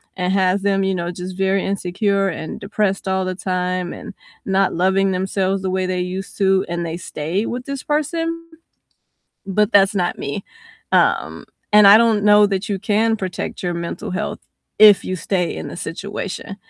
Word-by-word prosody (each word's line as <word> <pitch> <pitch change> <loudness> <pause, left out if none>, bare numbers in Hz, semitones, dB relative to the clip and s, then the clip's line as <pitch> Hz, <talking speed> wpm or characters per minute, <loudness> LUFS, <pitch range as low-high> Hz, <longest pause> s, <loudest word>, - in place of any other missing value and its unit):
and 180 0 -1
has 190 0 +2
them, 195 -1 +1
you 190 -1 0
know, 175 0 -3
just 180 +1 -7
very 195 0 0
insecure 195 +1 0
and 160 -2 -6
depressed 200 -1 -1
all 190 0 0
the 185 0 -3
time 180 -1 -2
and 210 - -9 0.3
not 195 0 +1
loving 190 +2 +2
themselves 190 +1 -1
the 190 - -2
way 185 0 -1
they 185 0 -2
used 185 +2 -5
to, 190 -1 +3
and 170 0 -2
they 165 0 -4
stay 170 +4 -3
with 250 +1 -5
this 275 -1 -5
person, 330 +3 -2 1.0
but 210 +3 +1
that's 195 -1 +5
not 180 -3 -1
me, 140 +8 -4 0.5
um, - - +1 0.3
and 210 -1 +8
I 205 - +10
don't 225 -3 +3
know 210 0 +6
that 195 +2 -3
you 200 - -1
can 220 +1 +1
protect 185 -3 -5
your 175 -1 -1
mental 170 +5 -5
health 210 +3 -3 0.4
if 210 -2 +8
you 185 - -3
stay 180 0 -1
in - - -6
the - - -8
situation, 195 +3 -6
195 Hz, 180 wpm, -20 LUFS, 185-205 Hz, 1.0 s, I